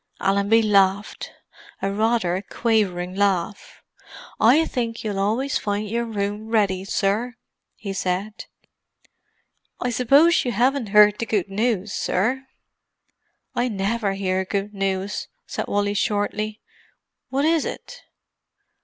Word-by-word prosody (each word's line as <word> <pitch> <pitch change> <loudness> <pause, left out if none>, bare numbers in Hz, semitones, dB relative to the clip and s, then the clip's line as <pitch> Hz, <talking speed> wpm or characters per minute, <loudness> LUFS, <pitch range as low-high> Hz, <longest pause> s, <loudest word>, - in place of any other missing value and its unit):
Allenby 200 +3 +3
laughed—a 195 -1 -1
rather 205 -3 0
quavering 190 -6 0
laugh. 200 0 -1 0.6
"I 275 +9 +5
think 230 -5 -3
you'll 205 -3 -2
always 230 +8 0
find 205 +1 -2
your 235 +3 -1
room 205 -1 -3
ready, 200 -4 +1
sir," 210 +5 -1 0.4
he 200 -2 -6
said. 195 +3 -3 1.3
"You—I 245 - -1
suppose 275 +8 +4
you 245 - -2
'aven't 250 +1 +1
'eard 210 +1 +5
our - - 0
good 200 -3 0
news, 210 -1 -1
sir?" 255 +8 -1 1.1
"I 245 0 0
never 205 -1 -1
hear 190 -1 -1
good 200 +2 -3
news," 195 0 -2 0.2
said - - -4
Wally 205 0 0
shortly. 210 +1 -1 0.7
"What 275 +3 0
is 325 -1 +3
it?" - - -7
210 Hz, 115 wpm, -23 LUFS, 195-230 Hz, 1.3 s, I